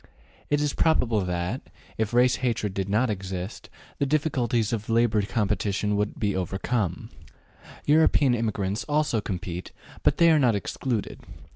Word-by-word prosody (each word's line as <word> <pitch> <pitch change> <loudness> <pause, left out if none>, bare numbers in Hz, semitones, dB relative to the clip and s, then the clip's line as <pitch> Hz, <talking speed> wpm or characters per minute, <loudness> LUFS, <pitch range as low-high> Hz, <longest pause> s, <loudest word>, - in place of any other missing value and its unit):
It 145 0 +2
is 150 -1 0
probable 120 -9 +2
that, 90 +7 -2 0.3
if 110 -1 -1
race 125 +1 +4
hatred 115 -5 -1
did 95 0 -3
not 110 +4 +2
exist, 95 -1 -5 0.3
the 140 - +1
difficulties 125 -7 0
of 105 -1 -3
labor 115 -2 +3
competition 105 0 0
could 105 +1 -2
be 100 -2 0
overcome. 95 +1 -2 0.7
European 150 -3 +4
immigrants 105 -3 -1
also 150 -7 +1
compete, 90 -2 -5 0.3
but - - +2
they 170 -1 +6
are 155 - +5
not 120 -6 +3
excluded. 110 +2 -3
110 Hz, 140 wpm, -26 LUFS, 100-125 Hz, 0.7 s, they